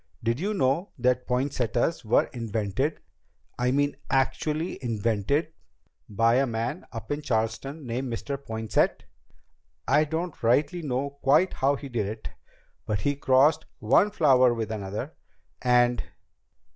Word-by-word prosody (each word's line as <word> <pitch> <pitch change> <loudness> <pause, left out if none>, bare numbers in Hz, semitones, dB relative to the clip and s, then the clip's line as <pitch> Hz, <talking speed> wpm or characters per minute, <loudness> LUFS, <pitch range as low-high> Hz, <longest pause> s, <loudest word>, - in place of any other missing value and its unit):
Did 115 +2 0
you 205 +5 -1
know 165 +4 +1
that 125 0 +1
poinsettias 125 +2 0
were 110 - +3
invented 115 +5 -2 0.6
I 125 0 +2
mean, 145 +2 +1
actually 150 +4 -1
invented 115 - 0 0.6
by 115 +3 +3
a 135 0 +2
man 115 +8 -3
up 115 +2 -7
in 145 +1 -1
Charleston 130 +5 -2
named 125 +2 -3
Mr. 140 +4 -3
Poinsett? 110 -6 -1 0.8
I 150 +3 +4
don't 160 +2 -4
rightly 145 +9 +2
know 140 0 -3
quite 150 +8 +4
how 140 +2 +2
he 140 - -8
did 115 -6 -2
it, 110 +1 -6 0.6
but 105 -2 -1
he 145 0 0
crossed 145 +3 +3
one 130 - +3
flower 130 - +4
with 115 -1 -3
another, 105 +7 -4 0.5
and 125 -1 +3
130 Hz, 130 wpm, -26 LUFS, 115-145 Hz, 0.8 s, I